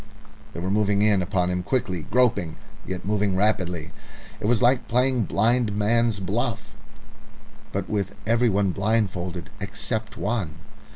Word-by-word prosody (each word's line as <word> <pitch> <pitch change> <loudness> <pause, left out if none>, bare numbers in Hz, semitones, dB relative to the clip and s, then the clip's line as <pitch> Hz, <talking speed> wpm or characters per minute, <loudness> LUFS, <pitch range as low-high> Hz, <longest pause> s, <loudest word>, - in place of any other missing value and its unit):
They - - -6
were 95 +2 -2
moving 100 0 +2
in 105 -3 +4
upon 90 -1 0
him 90 0 -1
quickly, 90 -6 -2
groping, 105 -9 +2 0.3
yet 95 -1 -5
moving 105 -2 +1
rapidly. 95 -5 0 0.5
It - - -2
was 120 -1 +3
like 125 +1 +3
playing 125 -2 +2
blind 110 +4 +1
man's 115 +1 +2
buff, 110 +5 -2 1.1
with 100 -2 -2
everyone 105 -4 +2
blindfolded 95 -4 -1
except 105 +2 -3
one. 105 -8 -2
105 Hz, 125 wpm, -24 LUFS, 95-115 Hz, 1.1 s, in